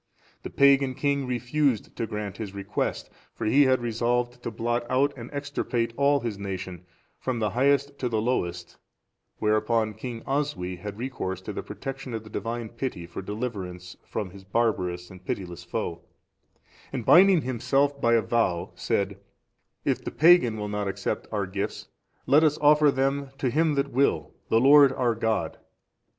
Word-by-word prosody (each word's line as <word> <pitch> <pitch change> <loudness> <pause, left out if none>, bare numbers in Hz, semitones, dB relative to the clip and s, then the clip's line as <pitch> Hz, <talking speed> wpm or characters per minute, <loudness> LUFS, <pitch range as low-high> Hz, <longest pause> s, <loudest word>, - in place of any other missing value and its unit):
The - - -6
pagan 140 -1 +4
king 140 0 0
refused 125 +1 0
to 115 - -3
grant 105 -2 -5
his 100 -3 -6
request, 100 0 -3 0.2
for - - -4
he 140 +6 +5
had 130 0 +3
resolved 120 +1 -1
to - - -3
blot 120 +2 -1
out 140 +3 +2
and 120 -2 -8
extirpate 140 -5 -2
all 140 +1 +3
his 115 -4 -4
nation, 95 -3 -6 0.3
from 130 -2 -2
the 105 -2 0
highest 140 +4 +1
to 125 - -1
the 110 -2 0
lowest; 90 -7 -2 0.6
whereupon 110 +1 +1
King 115 0 -7
Oswy 135 -11 -2
had 100 +3 -7
recourse 115 -7 -4
to - - -6
the - - -4
protection 135 -2 -6
of 110 - -5
the 110 - -13
Divine 115 0 -4
pity 115 -7 -5
for 85 +2 -7
deliverance 95 -4 -5
from 100 -4 -4
his 95 +1 -13
barbarous 95 -4 -1
and 90 0 -13
pitiless 90 -2 -5
foe, 85 -1 -4 0.9
and 125 -5 -4
binding 185 -2 +7
himself 135 +3 0
by 115 0 +4
a 115 - +3
vow, 95 -6 0
said, 100 -1 -1 0.7
"If - - 0
the - - -3
pagan 155 -9 +5
will 105 -1 -3
not 105 -1 -2
accept 100 0 -3
our 105 -3 -1
gifts, 100 +2 -4 0.4
let 150 +3 +5
us 155 -1 +3
offer 150 0 +5
them 135 +1 0
to 130 -3 0
Him 155 +1 +2
that 140 0 0
will, 125 - +1 0.2
the 115 - +4
Lord 140 +2 +7
our 125 -3 +1
God." 110 -1 -1
115 Hz, 165 wpm, -26 LUFS, 100-135 Hz, 0.9 s, binding